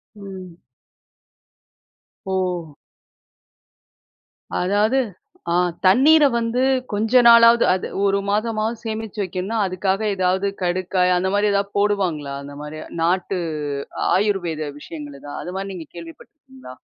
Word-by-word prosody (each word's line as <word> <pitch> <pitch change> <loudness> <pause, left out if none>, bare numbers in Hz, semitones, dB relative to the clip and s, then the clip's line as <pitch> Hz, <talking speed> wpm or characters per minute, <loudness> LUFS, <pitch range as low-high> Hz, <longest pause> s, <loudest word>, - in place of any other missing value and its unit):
ம். 190 -4 -10 1.7
ஓ! 190 - -3 2.3
அதாவது 205 +7 +2 0.9
தண்ணீர 290 +11 +6
வந்து 230 +2 -1 0.3
கொஞ்ச 225 +4 +3
நாளாவது 235 0 +7 0.4
ஒரு 200 0 +2
மாதமாவது 215 +2 -1
சேமிச்சு 220 -1 -5
வைக்கணும்னா, 185 +4 -3
அதுக்காக 190 +2 -1
ஏதாவது 185 +1 +1 0.2
கடுக்காய் 180 0 +1
அந்த 190 +1 0
மாதிரி 205 +1 +2
ஏதாவது 200 0 -1
போடுவாங்களா? 185 -9 0
அந்த 145 0 -10
மாரி 150 +1 -7 0.2
நாட்டு, 185 +2 0 0.8
ஆயுர்வேத 175 -7 -1
விஷயங்கள் 145 -3 -10
தான் 145 - -6
அது 180 - -6
மாதிரி 195 0 -4
நீங்க 165 -4 -8
கேள்வி 165 -1 -8
பட்டுருக்கீங்களா? 265 - -15
195 Hz, 105 wpm, -21 LUFS, 180-220 Hz, 2.3 s, நாளாவது